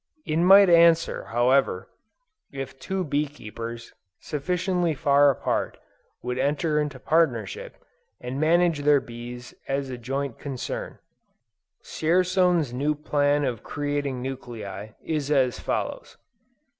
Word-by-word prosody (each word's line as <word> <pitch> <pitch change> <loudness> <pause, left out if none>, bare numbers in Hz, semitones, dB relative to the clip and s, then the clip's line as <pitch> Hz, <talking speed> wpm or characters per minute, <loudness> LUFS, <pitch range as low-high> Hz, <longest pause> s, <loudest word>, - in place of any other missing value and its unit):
It 155 - -1
might 195 +3 +7
answer, 170 -1 +4
however, 120 -4 +1 0.6
if 135 -1 -7
two 190 +6 -2
bee 150 -1 0
keepers, 115 -3 -8 0.3
sufficiently 180 +2 -1
far 145 -1 +4
apart, 135 - -1 0.5
would 125 +1 -3
enter 150 +2 +1
into 150 -2 -2
partnership, 130 - 0 0.4
and 125 +2 -5
manage 170 0 +3
their 145 0 +4
bees 120 0 -9
as 135 -1 -2
a 125 - -6
joint 135 +1 -4
concern. 135 -4 -5 0.9
Dzierzon's 180 -3 +1
new 145 +4 0
plan 145 -1 +1
of 120 -4 -3
creating 145 -3 -3
nuclei, 110 -6 -7
is 150 -3 -2
as 130 -4 +2
follows. - - -4
145 Hz, 115 wpm, -25 LUFS, 125-160 Hz, 0.9 s, might